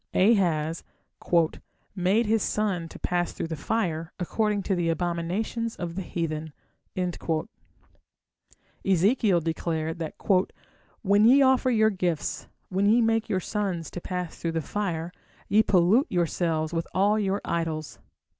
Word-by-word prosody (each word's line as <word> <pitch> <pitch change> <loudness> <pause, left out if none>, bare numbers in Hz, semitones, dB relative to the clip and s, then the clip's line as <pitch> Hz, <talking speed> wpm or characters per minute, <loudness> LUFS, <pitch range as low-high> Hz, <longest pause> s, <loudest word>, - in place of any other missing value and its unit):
Ahaz 170 -6 +2 1.1
"made 195 +5 +2
his 220 0 +2
son 190 -7 -1
to - - -10
pass 175 -1 -1
through 165 - -4
the 160 - -3
fire, 165 -1 -2
according 210 +2 0
to 195 - 0
the 175 -2 0
abominations 175 +7 -2
of 175 -1 -5
the 190 - -4
heathen". 160 -3 -4 2.3
Ezekiel 195 0 +3
declared 160 0 -2
that 160 -2 -4 0.9
"when 200 +1 +4
ye 270 +4 +7
offer 260 0 +3
your 220 -2 +4
gifts, 180 -5 -2 0.2
when 195 +2 +1
ye 225 +3 +5
make 225 -1 +1
your 190 -3 +1
sons 185 -5 -3
to 175 - -6
pass 180 -2 -5
through 165 -1 -2
the 165 - 0
fire, 170 -1 -3 0.4
ye 210 +2 +5
pollute 205 - +3
yourselves 165 -2 0
with 165 0 -2
all 205 +3 +3
your 200 -1 0
idols". 155 -7 -3
180 Hz, 135 wpm, -26 LUFS, 165-210 Hz, 2.3 s, ye